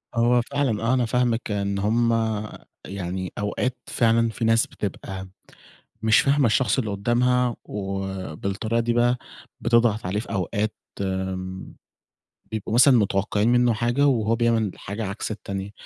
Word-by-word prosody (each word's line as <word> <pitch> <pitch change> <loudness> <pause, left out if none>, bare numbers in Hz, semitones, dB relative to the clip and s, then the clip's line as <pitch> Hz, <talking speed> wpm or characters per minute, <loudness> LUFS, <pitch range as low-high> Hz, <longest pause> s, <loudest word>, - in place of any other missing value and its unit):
هو 120 +1 +4
فعلًا، 130 -4 -1
آه، 115 +3 +2
أنا 125 -2 +2
فاهمِك 120 -1 0
إن 100 -1 -1
هُم 115 +4 +2 0.8
يعني 95 -1 -4
أوقات 120 +5 -1
فعلًا 115 -1 +2
في 115 +1 -3
ناس 115 +1 +3
بتبقى 95 -1 -6 0.7
مش 110 -1 +5
فاهمة 140 0 +3
الشخص 115 +1 +2
اللي 110 -5 -2
قدامها، 120 +4 +1
وبالطريقة 95 +2 -3
دي 115 0 +1
بقى 120 +1 +3 0.4
بتضغط 115 -3 +2
عليه. 95 +3 -1
في 115 - -7
أوقات 105 +2 -1 0.3
آمم، 95 -1 -4 0.8
بيبقوا 110 0 -4
مثلًا 125 +2 +7
متوقعين 105 +1 +1
منّه 120 -1 +4
حاجة، 120 +6 +1
وهو 115 -4 +2
بيعمل 115 -3 +1
حاجة 105 +2 -5
عكس 100 +3 -4
التانية، 100 -2 -5
110 Hz, 135 wpm, -24 LUFS, 100-120 Hz, 0.8 s, مثلًا